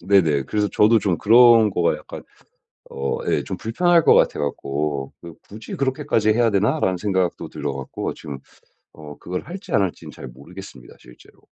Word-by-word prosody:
네네. 85 Hz, -7 st, +2 dB
그래서 105 Hz, +7 st, -1 dB
저도 110 Hz, +2 st, +4 dB
좀 95 Hz, -5 st, -1 dB
그런 115 Hz, -1 st, +6 dB
거가 90 Hz, -3 st, 0 dB
약간 -, -, -11 dB, 0.7 s
어 70 Hz, 0 st, -3 dB
예 -, -, 0 dB
좀 -, -, -5 dB
불편할 170 Hz, +8 st, +1 dB
것 -, -, +6 dB
같아 -, -, +2 dB
갖고 70 Hz, -1 st, -3 dB
그 85 Hz, -2 st, -11 dB
'굳이 105 Hz, +1 st, -9 dB
그렇게까지 130 Hz, -5 st, 0 dB
해야 115 Hz, +1 st, +2 dB
되나?'라는 100 Hz, -1 st, 0 dB
생각도 95 Hz, -2 st, -2 dB
들어 70 Hz, -, -5 dB
갖고 65 Hz, -1 st, -5 dB
지금 70 Hz, -2 st, -9 dB, 0.6 s
어 75 Hz, -2 st, -12 dB
그걸 90 Hz, +1 st, -5 dB
할지 185 Hz, +5 st, -10 dB
안 100 Hz, -, +3 dB
할지는 95 Hz, -3 st, -4 dB
잘 -, -, -10 dB
모르겠습니다, 70 Hz, +1 st, -13 dB
실제로. -, -, -19 dB
95 Hz, 350 characters per minute, -21 LUFS, 75-110 Hz, 0.7 s, 그런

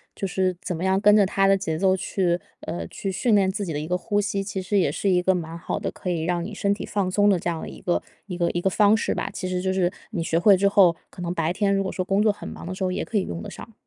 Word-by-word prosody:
就 -, -, -3 dB
是 185 Hz, -1 st, 0 dB
怎 180 Hz, -, -3 dB
么 180 Hz, -, -3 dB
样 190 Hz, +1 st, +2 dB
跟 210 Hz, 0 st, +6 dB
着 205 Hz, -1 st, +6 dB
他 195 Hz, +1 st, +2 dB
的 195 Hz, 0 st, +5 dB
节 160 Hz, -4 st, -3 dB
奏 190 Hz, +2 st, +3 dB
去， 180 Hz, -2 st, 0 dB, 0.2 s
呃， 170 Hz, -, -5 dB
去 195 Hz, -, -4 dB
训 220 Hz, +3 st, +2 dB
练 190 Hz, -2 st, +3 dB
自 200 Hz, +1 st, -3 dB
己 165 Hz, -, -4 dB
的 145 Hz, -, -2 dB
一 155 Hz, -, -4 dB
个 180 Hz, +2 st, 0 dB
呼 205 Hz, +2 st, 0 dB
吸， 200 Hz, -1 st, -1 dB
其 195 Hz, -1 st, -4 dB
实 200 Hz, +3 st, 0 dB
也 170 Hz, -, +2 dB
是 195 Hz, +7 st, -1 dB
一 180 Hz, -1 st, +3 dB
个 190 Hz, +1 st, +2 dB
蛮 165 Hz, -1 st, -5 dB
好 -, -, -3 dB
的 -, -, -3 dB
可 180 Hz, -, -6 dB
以 170 Hz, -2 st, -1 dB
让 175 Hz, 0 st, 0 dB
你 215 Hz, -, -7 dB
身 200 Hz, 0 st, +1 dB
体 205 Hz, -, -5 dB
放 195 Hz, -3 st, -1 dB
松 205 Hz, +1 st, +4 dB
的 190 Hz, -, +4 dB
这 175 Hz, -, -2 dB
样 165 Hz, -2 st, -3 dB
的 -, -, -6 dB
一 -, -, -10 dB
个， 175 Hz, -, 0 dB, 0.3 s
一 180 Hz, -3 st, -5 dB
个 170 Hz, -1 st, +1 dB
一 175 Hz, -, -2 dB
个 190 Hz, -, +2 dB
方 210 Hz, +2 st, +4 dB
式 220 Hz, -, 0 dB
吧。 -, -, -3 dB
其 185 Hz, -, -5 dB
实 180 Hz, 0 st, -1 dB
就 190 Hz, 0 st, 0 dB
是 180 Hz, -2 st, +1 dB, 0.2 s
你 170 Hz, -, -2 dB
学 165 Hz, 0 st, +1 dB
会 195 Hz, +2 st, +6 dB
之 200 Hz, +2 st, +3 dB
后， 185 Hz, -4 st, +5 dB
可 180 Hz, -, -11 dB
能 175 Hz, 0 st, -2 dB
白 165 Hz, -1 st, 0 dB
天 200 Hz, +2 st, +1 dB
如 195 Hz, -, +1 dB
果 190 Hz, -, -3 dB
说 185 Hz, -, -3 dB
工 195 Hz, +2 st, +2 dB
作 215 Hz, -, +4 dB
很 205 Hz, -, -9 dB
忙 -, -, -8 dB
的 185 Hz, -, -4 dB
时 190 Hz, -, -9 dB
候 185 Hz, -1 st, 0 dB
也 195 Hz, -, -2 dB
可 220 Hz, -, -2 dB
以 195 Hz, -, +2 dB
用 85 Hz, -1 st, -6 dB
得 -, -, -7 dB
上。 -, -, -11 dB
185 Hz, 355 characters per minute, -24 LUFS, 175-200 Hz, 0.3 s, 跟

